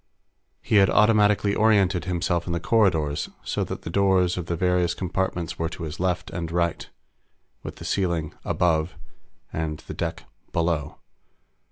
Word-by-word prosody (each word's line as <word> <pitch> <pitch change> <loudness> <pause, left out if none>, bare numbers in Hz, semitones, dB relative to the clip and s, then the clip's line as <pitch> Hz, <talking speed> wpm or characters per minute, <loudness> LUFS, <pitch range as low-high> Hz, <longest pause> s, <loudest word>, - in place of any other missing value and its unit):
He 105 - +2
had 95 -1 +6
automatically 105 -2 +4
oriented 100 -5 +3
himself 85 -1 -1
in 85 - -1
the 85 - 0
corridors 85 -9 +1
so - - -1
that - - -6
the 80 - -5
doors 95 -2 +3
of 90 -2 -5
the 85 - -1
various 90 0 +1
compartments 90 -2 -2
were 80 0 0
to 85 - -8
his 80 0 -6
left 90 0 -1
and 85 -2 -4
right, 85 -1 -1 0.7
with - - -7
the - - -10
ceiling 85 -5 -1
"above" 80 -1 +1 0.6
and 80 -1 -2
the - - -6
deck - - -4 0.3
"below." 85 -3 -1
90 Hz, 155 wpm, -25 LUFS, 85-95 Hz, 0.7 s, had